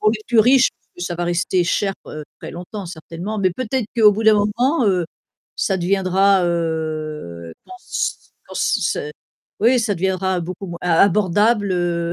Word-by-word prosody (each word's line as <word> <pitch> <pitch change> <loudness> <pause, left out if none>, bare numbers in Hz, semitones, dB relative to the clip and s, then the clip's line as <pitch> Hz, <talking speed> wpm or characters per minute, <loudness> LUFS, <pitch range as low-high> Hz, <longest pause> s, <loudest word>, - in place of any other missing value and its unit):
Pour 215 - +4
les 215 -1 -3
plus 235 -3 +2
riches, 255 +3 +5 0.2
plus 175 - -9
ça 175 -1 -3
va 175 - -2
rester 175 +1 0
cher, 195 +3 0
heu, 155 0 -7 0.2
très - - -7
longtemps 180 +3 -7
certainement, 170 +5 -6
mais 190 -2 +2
peut-être 255 +4 -2
qu'au 215 -2 +7
bout 220 - -3
d'un 220 -1 +7
moment, 235 +7 +1
heu, 185 -3 +2 0.5
ça 195 - 0
deviendra, 190 +1 +2
heu, 155 - -3
je - - -25
pense, 370 0 -4
quand - - -11
c'est - - +1
c'est 450 -2 -2 0.5
oui 245 +4 +4
ça 215 -3 0
deviendra 190 0 -1
beaucoup 180 +3 -6
moins 170 -1 -7
ab 180 +2 +4
abordable, 205 +2 +2
heu, 170 -1 -1
190 Hz, 180 wpm, -20 LUFS, 170-215 Hz, 0.5 s, qu'au